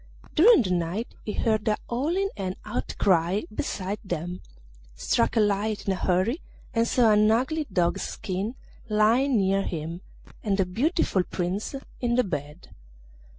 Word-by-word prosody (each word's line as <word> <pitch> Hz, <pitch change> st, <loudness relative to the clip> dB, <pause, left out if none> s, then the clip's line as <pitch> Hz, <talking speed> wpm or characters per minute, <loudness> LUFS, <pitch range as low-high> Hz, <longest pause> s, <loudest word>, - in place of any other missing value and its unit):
During 355 Hz, -, +7 dB
the 185 Hz, -, -2 dB
night 180 Hz, +6 st, -1 dB
he 210 Hz, -, -4 dB
heard 220 Hz, -2 st, 0 dB
a 210 Hz, -, +2 dB
howling 330 Hz, +11 st, 0 dB
and 190 Hz, -2 st, -3 dB
outcry 190 Hz, -2 st, +1 dB
beside 200 Hz, -1 st, -3 dB
them, 175 Hz, -1 st, -4 dB, 0.5 s
struck 115 Hz, -, +1 dB
a -, -, +6 dB
light 210 Hz, 0 st, +1 dB
in 195 Hz, -, +1 dB
a -, -, -2 dB
hurry 190 Hz, -, +1 dB, 0.3 s
and 230 Hz, 0 st, +2 dB
saw 235 Hz, -3 st, +4 dB
an 210 Hz, 0 st, +5 dB
ugly 280 Hz, +7 st, +1 dB
dog's 175 Hz, -1 st, +1 dB
skin 195 Hz, +6 st, -3 dB, 0.3 s
lying 230 Hz, +5 st, +3 dB
near 195 Hz, 0 st, +2 dB
him, 165 Hz, -1 st, -4 dB, 0.4 s
and 200 Hz, -2 st, 0 dB
a 190 Hz, -, +4 dB
beautiful 225 Hz, -, +1 dB
Prince 180 Hz, +7 st, -3 dB, 0.2 s
in 240 Hz, -1 st, +1 dB
the 250 Hz, -, +4 dB
bed. 150 Hz, -, -6 dB
205 Hz, 150 wpm, -26 LUFS, 180-235 Hz, 0.5 s, During